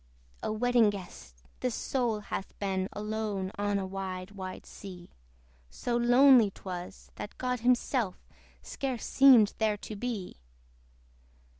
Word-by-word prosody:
O - - -2
Wedding 235 0 +3
Guest! 175 - -9 0.2
this 250 -2 -1
soul 235 -5 -1
hath 195 -1 -6
been 190 -2 -1
Alone 210 -2 -3
on 205 0 +1
a 195 - -2
wide 185 -1 -5
wide 190 -2 -7
sea: 180 -3 -11 0.6
So 240 - -3
lonely 245 -1 +6
'twas, 185 -1 -8
that 205 - -7
God 250 -1 -1
himself 245 -3 +1 0.5
Scarce 260 -4 -4
seemed 255 -6 +6
there 215 -2 +2
to 215 - -8
be. 210 -4 -4
210 Hz, 125 wpm, -30 LUFS, 190-245 Hz, 0.6 s, lonely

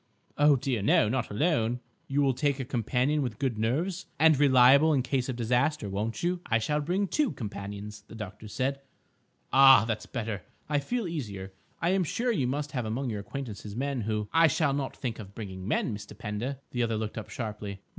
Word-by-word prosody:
"Oh, 145 0 +5
dear, 130 -4 -1
no; 105 +1 +4
not 130 0 -1
alone." 120 -1 +1 0.3
"You 140 +1 +1
will 135 -1 +3
take 140 +1 0
a 130 - -2
companion 125 +5 0
with 125 -5 -3
good 130 -6 -1
nerves, 165 - -1
and 160 0 +6
reliable 140 +2 +6
in 135 -3 +2
case 130 0 -1
of 130 - -2
disaster, 125 +2 +1
won't 110 +7 -3
you?" 175 0 0
"I 115 - +3
shall 150 +7 0
bring 185 +7 0
two 295 +4 +1
companions," 105 -1 -7
the - - -11
doctor 105 0 -8
said. 135 +5 -2 0.7
"Ah, 135 -3 +8
that's 115 -2 -3
better. 110 -5 -4 0.3
I 150 -1 +1
feel 230 - -2
easier. 100 - -5 0.3
I 170 - +3
am 190 -1 +2
sure 240 +9 0
you 140 - 0
must 145 +3 -2
have 125 -4 -2
among 120 +3 -2
your 105 - -3
acquaintances 105 -3 -6
men 135 0 -1
who—" 105 -1 -2
"I 165 0 +6
shall 150 -1 +1
not 140 -1 -3
think 120 -4 -4
of 100 -2 -10
bringing 95 -4 -7
men, 110 0 0
Mr. 105 0 -10
Pender." 110 +6 -4
The 120 - -1
other 115 -2 0
looked 110 +1 -3
up 110 - -9
sharply. 105 -4 -5
125 Hz, 200 wpm, -28 LUFS, 110-145 Hz, 0.7 s, Ah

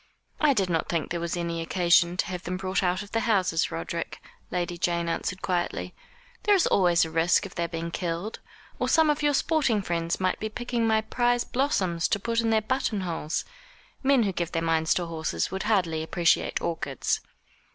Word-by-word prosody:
"I 300 -2 +4
did 195 -4 +2
not 165 -3 -1
think 165 -4 -1
there 170 - -1
was 170 +1 -2
any 170 -1 -2
occasion 175 +1 +3
to - - +1
have 180 -1 -5
them 185 +1 -3
brought 190 0 -1
out 185 +1 0
of 205 - -14
the 225 - +1
houses, 195 -8 +1
Roderick," 80 +1 -4 0.3
Lady 175 -1 -2
Jane 170 0 0
answered 185 +2 -3
quietly; 180 -2 -2 0.5
"there 415 - +4
is 370 - +3
always 175 -3 +4
a 160 - -7
risk 165 +2 +3
of - - -9
their 170 0 -1
being 170 0 -4
killed, 175 +5 -3 0.4
or - - 0
some 320 -2 +5
of 295 - -2
your 290 -1 +3
sporting 270 -10 +1
friends 170 -2 -1
might 185 -1 0
be 215 - -3
picking 240 +1 -1
my 220 0 +3
prize 240 +2 +1
blossoms 190 -11 0
to 205 - 0
put 230 +2 0
in 225 - 0
their 220 -1 +3
button 230 -4 -1
holes. 165 -3 -2 0.6
Men 270 -3 +4
who 200 - 0
give 175 -2 -3
their 165 -1 0
minds 165 0 +2
to 175 - -1
horses 160 - -2
would 190 0 -3
hardly 170 -7 +1
appreciate 165 +1 +1
orchids." 145 -5 -1
180 Hz, 200 wpm, -27 LUFS, 170-220 Hz, 0.6 s, some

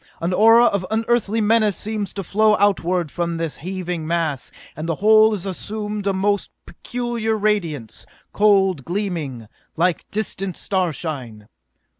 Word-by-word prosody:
An 170 +2 -1
aura 225 +4 +6
of 200 -5 +1
unearthly 225 0 +1
menace 215 -2 +3
seems 210 -2 -3
to 195 - -4
flow 210 +4 +3
outward 180 -5 +1
from 170 -1 -2
this 165 -2 -2
heaving 180 -1 -4
mass, 160 -6 -1 0.2
and 155 +3 -5
the 165 - 0
whole 215 +3 +5
is 200 -3 -4
assuming 210 +2 -4
a - - +3
most 200 +1 0 0.2
peculiar 240 -3 -3
radiance 175 - -2 0.3
cold 195 -7 +3
gleaming, 165 - -4 0.3
like 175 +1 0
distant 195 -3 -3
starshine!" 150 - -3
195 Hz, 135 wpm, -21 LUFS, 170-215 Hz, 0.3 s, aura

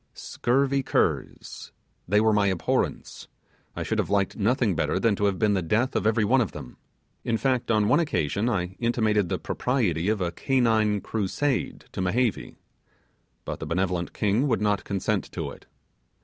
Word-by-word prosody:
Scurvy 135 +2 0
curs! - - -2 0.4
they 105 +4 +3
were 110 0 +3
my 105 -1 +3
abhorrence; 95 -3 -2 0.5
I - - -3
should - - -2
have - - -1
liked 100 -1 +1
nothing 110 -2 +1
better 85 - 0
than 110 0 +2
to 105 - 0
have 100 -2 +1
been 105 -2 +2
the 95 - +1
death 115 - 0
of - - +1
every 110 -1 +2
one 130 +5 +3
of 110 - -2
them. - - -9 0.5
In 115 - 0
fact, 130 0 0
on 105 -2 +3
one 145 +8 +4
occasion, 100 - 0
I 90 -4 -2
intimated 110 -5 +1
the - - -1
propriety 105 - -1
of 110 -1 0
a 90 -2 -1
canine 110 -2 +1
crusade 115 +6 -2
to - - -4
Mehevi; 110 +4 -1 0.9
but - - -5
the 80 - -6
benevolent 90 +1 -1
king 110 +6 +1
would 115 - +1
not 105 -2 0
consent 100 -2 -2
to - - -4
it. - - -14
105 Hz, 175 wpm, -26 LUFS, 95-120 Hz, 0.9 s, one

